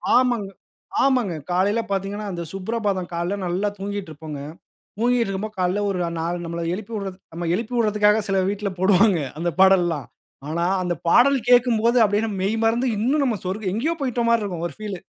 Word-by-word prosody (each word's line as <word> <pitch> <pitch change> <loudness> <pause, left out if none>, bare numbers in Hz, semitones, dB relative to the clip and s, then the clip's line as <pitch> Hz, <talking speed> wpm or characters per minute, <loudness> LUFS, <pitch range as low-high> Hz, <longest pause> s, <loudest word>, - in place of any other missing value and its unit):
ஆமாங்க, 245 -5 +2 0.6
ஆமாங்க. 250 -9 +2 0.2
காலையில 195 +5 +2
பார்த்தீங்கன்னா, 200 +2 -2
அந்த 170 -2 -4
சுப்ரபாதம் 195 -2 -2
காலையில 175 +4 -2
நல்லா 185 +4 0
தூங்கிட்டு 200 -2 -4
இருப்போங்க. 155 -1 -8 0.6
தூங்கிட்டு 240 0 +2
இருக்கும்போது 210 +2 -4
காலையில 185 +3 +1
ஒரு 190 - -2 0.2
நாலு, 170 +2 -1
நம்மள 170 0 -4
எழுப்பிவிட 205 0 -5 0.2
நாம்ம 170 +1 -4
எழுப்பி 230 +5 -3
விடுறதுக்காக 210 -1 +3
சில 195 - +1
வீட்ல 205 0 -2
போடுவாங்க. 190 +1 +4 0.2
அந்த 175 +1 0
பாடல்லாம். 175 -7 +4 0.4
ஆனா, 170 +2 -1 0.2
அந்த 175 -1 -1
பாடல் 270 +9 +5
கேட்கும்போது 240 -1 +4
அப்படியே 210 +2 +1
மெய்மறந்து 225 +5 +1
இன்னும் 270 +8 +2
நம்ம 240 -5 0
சொர்க 190 +1 -2
எங்கயோ 295 +10 0
போய்ட்ட 250 -3 -1
மாதிரி 235 -1 +3
இருக்கும் 175 -4 -4
ஒரு 170 - -7
பீல். 205 -3 -4
205 Hz, 160 wpm, -23 LUFS, 180-230 Hz, 0.6 s, பாடல்